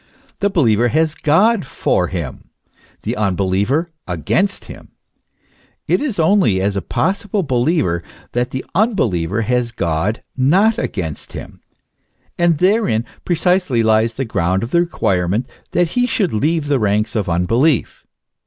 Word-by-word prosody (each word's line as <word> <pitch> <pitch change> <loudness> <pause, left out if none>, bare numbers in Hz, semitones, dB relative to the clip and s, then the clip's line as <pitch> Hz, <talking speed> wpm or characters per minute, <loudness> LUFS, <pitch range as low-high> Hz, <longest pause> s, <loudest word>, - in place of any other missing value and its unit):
The 200 - +2
believer 120 - +3
has 155 +4 +1
God 190 +9 +3
for 135 - 0
him, - - -6 0.5
the - - -2
unbeliever, 100 - 0 0.2
against 95 - -1
him; - - -12 0.9
it - - +2
is 275 -8 -2
only 165 - +3
as 100 +1 0
a 100 - -1
pos 190 - -1
sible 205 -2 -1
believer 125 - +1 0.3
that 125 +1 -1
the 130 - -5
unbeliever 115 - +1
has 125 +1 0
God 90 +2 -1
not 185 - +3
against 80 -7 -4
him; - - -9 0.7
and 170 -2 +2
therein 180 - +2 0.2
precisely 180 -8 +1
lies 110 +1 +2
the 135 - -2
ground 95 -3 0
of 115 - -5
the 170 - +3
requirement 100 - 0 0.2
that 175 -2 +1
he 245 +6 +1
should 200 - 0
leave 155 +7 0
the 145 -2 +1
ranks 105 +1 0
of 105 -5 -1
unbelief. 115 - +1
125 Hz, 140 wpm, -18 LUFS, -, 0.9 s, believer